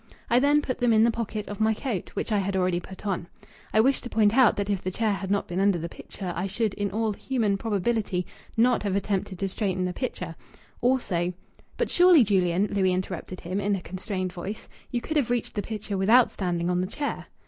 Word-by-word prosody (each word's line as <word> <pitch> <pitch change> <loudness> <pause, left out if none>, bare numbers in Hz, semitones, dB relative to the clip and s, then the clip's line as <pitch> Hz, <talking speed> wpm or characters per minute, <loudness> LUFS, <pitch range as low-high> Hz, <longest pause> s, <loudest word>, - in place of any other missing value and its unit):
I 240 - +6
then 290 +2 +4
put 255 -3 -3
them 245 -2 +3
in 220 0 +5
the 235 - +4
pocket 215 -2 -4
of 205 - -6
my 220 0 +3
coat 225 -7 -3
which - - -2
I 210 - +3
had 195 0 -1
already 180 -2 +1
put 190 +3 -11
on. 185 -4 -2 0.4
I 215 - +3
wish 270 +4 +2
to 245 - -7
point 215 -1 +3
out 255 -4 +6
that 200 -1 -2
if 200 -2 -1
the 185 - -2
chair 215 +3 0
had 190 0 -4
not 200 0 0
been 180 -1 -3
under 195 -2 +3
the 170 0 -4
picture 180 +1 -7
I 180 +3 -1
should 215 +1 -1
in 205 -1 -2
all 215 +2 0
human 220 -3 0
probability 205 -2 -1 0.3
not 245 +2 +4
have 200 -2 -1
attempted 195 -1 -1
to 195 - -1
straighten 190 -2 -1
the 180 - -2
picture. 180 -8 -4 0.5
Also 190 -9 +1 0.2
'" - - -30
"But - - -1
surely, 350 -5 +7
Julian," 190 -2 +2
Louis 190 -2 +2
interrupted 185 0 -4
him, 185 +3 -3
in 205 0 +1
a 190 - -4
constrained 185 0 -4
voice, 190 +5 -6 0.2
"you 240 - -2
could 310 +5 -2
have 260 -5 +1
reached 245 -2 -1
the 205 - -1
picture 210 -2 -4
without 225 +6 +5
standing 175 -2 -1
on 180 0 +1
the 185 - -1
chair?" 285 +8 -4
200 Hz, 230 wpm, -26 LUFS, 185-225 Hz, 0.5 s, surely